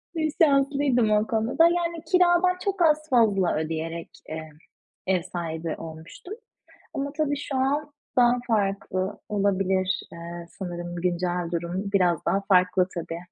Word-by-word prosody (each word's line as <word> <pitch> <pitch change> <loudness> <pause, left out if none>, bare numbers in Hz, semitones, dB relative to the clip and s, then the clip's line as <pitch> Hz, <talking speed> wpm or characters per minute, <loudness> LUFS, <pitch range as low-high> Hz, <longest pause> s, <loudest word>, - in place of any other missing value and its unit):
Bir 315 -2 0
şanslıydım 275 -5 +3
o 210 +1 +3
konuda 225 +1 -1
da. 330 - +7
Yani 340 -1 +1
kiradan 360 0 +4
çok 390 -2 -1
az 310 -1 +3
fazla 210 -7 +3
ödeyerek, 165 +1 -4 0.2
eee, 160 0 -6 0.6
ev 185 -2 +2
sahibi 165 -2 -4
olmuştum 165 - -9 0.6
ama 280 0 -3
tabii 295 -2 0
şu 280 -1 -4
an 285 +3 0 0.2
daha 240 -1 +6
farklı 195 -3 -1
olabilir. 190 -2 +1
Eee, 170 0 -8
sanırım 175 -2 -5
güncel 175 0 -1
durum 180 +4 -3
biraz 180 -4 +2
daha 195 - +2
farklı 185 0 +4
tabii. 165 -1 -4
195 Hz, 135 wpm, -25 LUFS, 175-285 Hz, 0.6 s, da